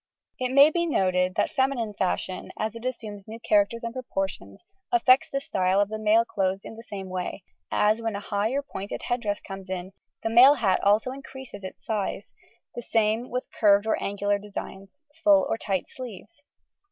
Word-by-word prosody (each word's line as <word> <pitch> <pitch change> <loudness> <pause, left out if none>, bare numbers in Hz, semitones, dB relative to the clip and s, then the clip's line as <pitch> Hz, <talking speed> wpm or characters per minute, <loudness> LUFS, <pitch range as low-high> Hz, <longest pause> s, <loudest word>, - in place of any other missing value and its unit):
It 255 0 -1
may 280 +3 +7
be 340 +1 0
noted 185 - +1
that - - +1
feminine 260 -5 0
fashion, 185 -1 -2
as 215 0 -2
it 230 +1 -9
assumes 215 -6 -5
new 225 +1 -8
characters 210 +1 +2
and 230 0 -4
proportions, 195 - -5 0.3
affects 270 -8 +5
the 275 - -1
style 190 -7 +1
of 205 0 +2
the 215 0 -4
male 215 +2 +4
clothes 195 -2 -1
in - - -8
the 225 - -10
same 200 -4 -7
way, 185 +1 -4 0.3
as, 215 +2 +2
when 225 -2 -2
a - - -3
high 205 +1 -1
or 280 +1 0
pointed 200 -7 -6
head 245 0 -1
dress 205 -2 -1
comes 195 -1 -9
in, 185 0 -4 0.3
the 225 - 0
male 255 +5 +8
hat 200 -8 +1
also 210 +5 +3
increases 265 -5 -10
its 190 - -9
size; 210 -3 -3 0.4
the 240 - -5
same 225 +1 +1
with 250 +1 -3
curved 205 -1 +4
or 220 - 0
angular 205 0 0
designs, 200 +5 -9 0.2
full 295 -2 +6
or - - 0
tight 190 -3 -2
sleeves. 255 - -10
215 Hz, 190 wpm, -26 LUFS, 195-250 Hz, 0.4 s, male